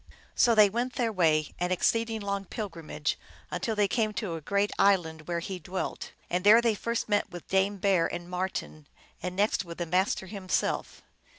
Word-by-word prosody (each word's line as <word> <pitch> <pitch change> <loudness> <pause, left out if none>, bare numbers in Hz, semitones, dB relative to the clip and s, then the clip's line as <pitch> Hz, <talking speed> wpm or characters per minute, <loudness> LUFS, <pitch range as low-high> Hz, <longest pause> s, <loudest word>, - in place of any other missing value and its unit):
So 235 -1 +4
they 210 -1 +8
went 240 +5 -2
their 230 -3 -1
way, 155 -5 +2
an 180 +1 -1
exceeding 225 +4 +1
long 200 -1 -2
pilgrimage, 165 -8 -4 0.3
until 225 - -2
they 205 -1 +3
came 215 +1 0
to 205 -5 -3
a 165 - -5
great 200 +5 0
island, 160 -6 +2
where 170 -1 -1
he 185 +1 -5
dwelt. 180 +3 -5
And 180 +1 -1
there 210 +3 +8
they 235 -2 +2
first 230 +3 -2
met 205 -1 +1
with 175 -2 -10
Dame 195 +1 +2
Bear 190 -3 +2
and 175 0 -5
Marten, 180 -4 -4 0.3
and 180 +1 -4
next 200 -1 +1
with 170 -2 -9
the 175 - -2
Master 185 +3 +1
himself. 190 -1 -2
190 Hz, 185 wpm, -28 LUFS, 175-210 Hz, 0.3 s, they